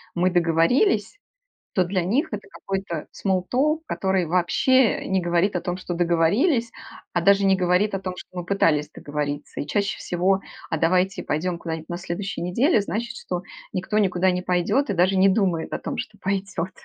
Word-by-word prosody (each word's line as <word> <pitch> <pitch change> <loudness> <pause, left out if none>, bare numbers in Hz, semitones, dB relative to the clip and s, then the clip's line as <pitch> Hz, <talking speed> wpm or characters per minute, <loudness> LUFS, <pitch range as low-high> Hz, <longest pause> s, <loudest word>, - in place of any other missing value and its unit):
"мы 180 +1 +2
договорились", 175 - +2 0.6
то 185 -2 +2
для 185 0 -1
них 240 - +1
это 205 -1 -6
какой-то 190 -5 -4
small 185 -2 -1
talk, 300 +5 +2
который 190 -2 0
вообще 185 +9 +2
не 190 -1 +1
говорит 175 +3 +1
о 180 - 0
том, 180 0 -3
что 185 -1 -5
договорились, 180 - +2 0.4
а 175 - +1
даже 200 +2 +4
не 195 0 +5
говорит 185 +3 +2
о 195 - -2
том, 185 -1 -4
что - - -9
мы 180 -1 -4
пытались 165 -6 +2
договориться. 145 0 -4
И - - -4
чаще 200 +6 -1
всего: 190 +2 +1 0.3
"А 160 - -1
давайте 180 +4 +1
пойдем 170 +4 -1
куда-нибудь 160 -1 -5
на 175 - -3
следующей 185 +2 -4
неделе"- 220 - +2
значит, 235 +4 -4
что 180 -5 -4 0.3
никто 190 +3 -2
никуда 185 -2 +2
не 180 0 -1
пойдет 180 +10 +1
и - - +1
даже 185 +2 +3
не 190 +1 +5
думает 185 -5 0
о - - -2
том, - - -5
что 210 - -6
пойдёт. 190 -2 -2
185 Hz, 180 wpm, -24 LUFS, 175-200 Hz, 0.6 s, не